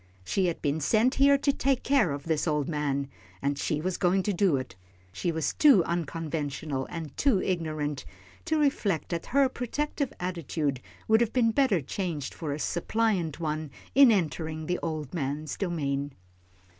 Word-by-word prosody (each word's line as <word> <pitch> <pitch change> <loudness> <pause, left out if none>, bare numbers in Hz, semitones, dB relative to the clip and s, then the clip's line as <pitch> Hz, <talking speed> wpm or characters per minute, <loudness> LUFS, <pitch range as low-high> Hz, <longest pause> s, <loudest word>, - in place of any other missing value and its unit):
She 190 - +1
had 170 - -3
been 145 +1 +1
sent 220 - +3
here 280 +1 +5
to 280 0 +1
take 270 -1 0
care 270 - +3
of 140 0 -4
this 160 +1 0
old 150 -3 0
man, 145 -3 -1 0.3
and 140 +5 0
she 150 +1 -1
was 185 +2 -2
going 185 +1 +2
to 205 - 0
do 180 -5 +3
it. 130 -7 -6 0.4
She 170 - -2
was 160 -3 -1
too 275 - +6
unconventional, 155 -4 -3
and 160 -4 -6
too 265 -9 +3
ignorant, 155 -6 -2 0.4
to 315 - +1
reflect 225 - +1
that 170 -1 -3
her 275 +1 +4
protective 275 +3 -3
attitude 160 -6 -2 0.3
would 220 +1 +5
have 230 -2 +1
been 235 -3 +3
better 230 - +2
changed 155 -1 -4
for 160 -4 -4
a 140 - -2
suppliant 175 -1 0
one 155 -1 -2 0.2
in 275 -3 +8
entering 160 -4 -1
the 180 +2 -1
old 155 -4 -4
man's 145 -1 -3
domain. 145 -6 -2
165 Hz, 170 wpm, -28 LUFS, 150-215 Hz, 0.4 s, in